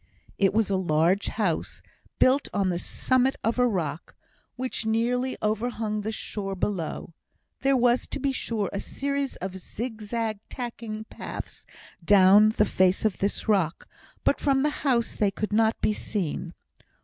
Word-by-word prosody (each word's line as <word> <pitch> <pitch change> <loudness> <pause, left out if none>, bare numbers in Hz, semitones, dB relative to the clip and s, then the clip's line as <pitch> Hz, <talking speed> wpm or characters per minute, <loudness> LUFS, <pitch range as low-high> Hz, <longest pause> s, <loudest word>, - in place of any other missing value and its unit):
It 195 -1 +4
was 215 -1 +1
a 190 - +2
large 175 +2 +2
house, 195 -7 -2 0.3
built 265 +3 +4
on 195 -2 +2
the 175 -1 -1
summit 255 +6 +1
of 230 +2 0
a 250 - +5
rock, 165 -8 -3 0.4
which 255 -1 -3
nearly 240 +4 0
overhung 215 0 -1
the 215 +2 -3
shore 195 -2 -4
below; 180 -4 -3 0.5
there 270 0 +3
were, 245 0 +4
to - - -7
be 275 0 +1
sure, 225 -5 -2
a 200 - -2
series 280 +4 -3
of 190 0 -6
zigzag 220 +1 -4
tacking 230 -3 -5
paths - - -8 0.4
down 200 +2 +7
the 215 -1 +2
face 185 +1 +2
of 210 -4 +1
this 200 +3 -1
rock, 190 -7 +1 0.4
but - - +2
from 270 -1 +2
the 300 - +2
house 245 -5 +1
they 205 - +2
could 210 +2 -4
not 220 +1 +3
be 215 - +2
seen. 175 -4 -3
215 Hz, 155 wpm, -26 LUFS, 195-245 Hz, 0.5 s, down